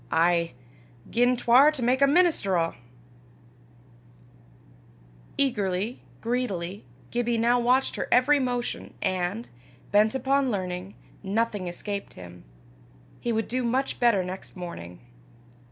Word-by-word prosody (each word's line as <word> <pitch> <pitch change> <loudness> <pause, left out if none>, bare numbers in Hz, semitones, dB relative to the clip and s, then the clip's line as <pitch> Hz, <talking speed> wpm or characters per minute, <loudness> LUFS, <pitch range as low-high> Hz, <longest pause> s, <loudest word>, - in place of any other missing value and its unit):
ay, 170 -1 +2 0.6
gien 245 +2 +3
'twar 255 +5 +6
to 280 -5 -4
mak 255 +3 +2
a 280 - +6
minister 295 - +3
o'!" 165 0 0 2.6
Eagerly, 210 -4 -1 0.2
greedily, 205 -6 -2 0.3
Gibbie 240 -1 0
now 240 +2 +3
watched 250 +3 +2
her - - -2
every 280 +4 +5
motion, 245 -2 -3
and, 185 +5 -1 0.4
bent 215 +3 +4
upon 270 +1 +1
learning, 185 -2 -4 0.3
nothing 205 -1 -1
escaped 200 +3 -5
him: 90 -1 -11 0.8
he 240 - -2
would 225 -1 -1
do 255 +1 -1
much 255 +3 -1
better 230 -6 +3
next 185 +1 -7
morning! 90 - -8
230 Hz, 115 wpm, -26 LUFS, 185-250 Hz, 2.6 s, twar